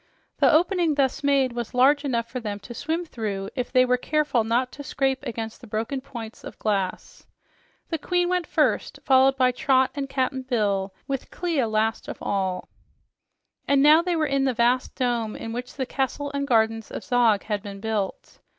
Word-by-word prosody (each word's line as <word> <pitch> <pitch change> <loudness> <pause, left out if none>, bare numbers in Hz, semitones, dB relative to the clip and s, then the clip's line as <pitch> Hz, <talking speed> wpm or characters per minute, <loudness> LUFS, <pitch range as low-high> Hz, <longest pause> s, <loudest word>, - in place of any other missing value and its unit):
The - - +5
opening 335 -1 +3
thus 275 -1 0
made 275 -3 +2
was 240 0 -5
large 280 +3 +5
enough 235 -5 -1
for 255 +2 -5
them 210 -3 -4
to 240 - -9
swim 320 +8 -2
through 205 -8 -4
if 250 -1 -3
they 255 0 +5
were 250 0 +2
careful 290 -3 +1
not 240 +3 0
to 285 - -9
scrape 270 -2 -1
against 225 0 -5
the 245 - -12
broken 225 +6 -3
points 235 -5 -9
of - - -9
glass. 195 -3 -3 0.6
The 325 - -2
queen 355 +3 +1
went 360 -1 0
first, - - +1
followed 265 0 +5
by 255 -1 +4
Trot 260 +1 +2
and 280 -1 -4
Cap'n 260 0 -1
Bill, 205 -6 0 0.2
with 270 -2 -3
Clia 325 -9 -1
last 220 +1 0
of - - -6
all. 190 -2 -2 1.0
And 280 -1 +4
now 305 +2 +7
they 350 0 -1
were 315 -1 +1
in 275 -1 +1
the 260 -2 0
vast 245 +2 +1
dome 235 -4 -1
in 225 - -6
which 245 +1 -6
the 265 - -2
castle 280 +2 -2
and 280 0 -2
gardens 225 -2 +2
of - - -6
Zog 235 -4 +3
had 210 -2 -2
been 200 -1 -8
built. 210 -2 -3
255 Hz, 190 wpm, -25 LUFS, 225-280 Hz, 1.0 s, now